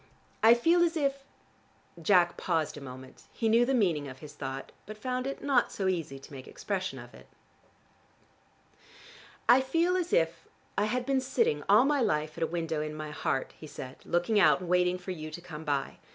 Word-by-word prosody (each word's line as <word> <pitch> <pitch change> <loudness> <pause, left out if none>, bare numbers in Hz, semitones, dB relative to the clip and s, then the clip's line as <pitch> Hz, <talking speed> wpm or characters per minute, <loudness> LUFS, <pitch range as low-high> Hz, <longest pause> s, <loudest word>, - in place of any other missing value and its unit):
I 230 +1 +8
feel 335 +9 +3
as 340 -1 +2
if 275 -2 -1 0.4
" 170 - -21
Jack 175 -1 +4
paused 165 -4 -1
a 145 - -9
moment: 130 -1 -11
he 225 - -1
knew 230 +2 +5
the 270 - +2
meaning 170 - +1
of 130 -1 -9
his 150 +1 -11
thought, 135 -2 -6 0.2
but 215 0 -8
found 255 +3 -3
it 275 - -5
not 270 -4 +2
so 195 - -2
easy 165 -7 -2
to 135 - -14
make 130 -1 -9
expression 185 -2 -4
of - - -11
it. - - -15 2.2
"I 255 +2 +7
feel 335 +7 +1
as 360 -2 -1
if 165 +1 +1 0.3
I 205 - +2
had 245 +3 -1
been 270 -1 +1
sitting 450 - +1
all - - +7
my 285 -1 +2
life 155 -7 0
at 170 - -2
a - - +1
window 165 -2 -2
in 155 0 -4
my 155 -1 -6
heart," 135 -3 -2
he 155 - -9
said, 130 -3 -8
"looking 175 +5 +1
out, 185 - +5
and 180 - -7
waiting 180 0 +3
for 180 +1 -7
you 155 -3 -6
to 155 - -8
come 160 -3 -9
by. 145 -3 -2
180 Hz, 205 wpm, -29 LUFS, 155-250 Hz, 2.2 s, I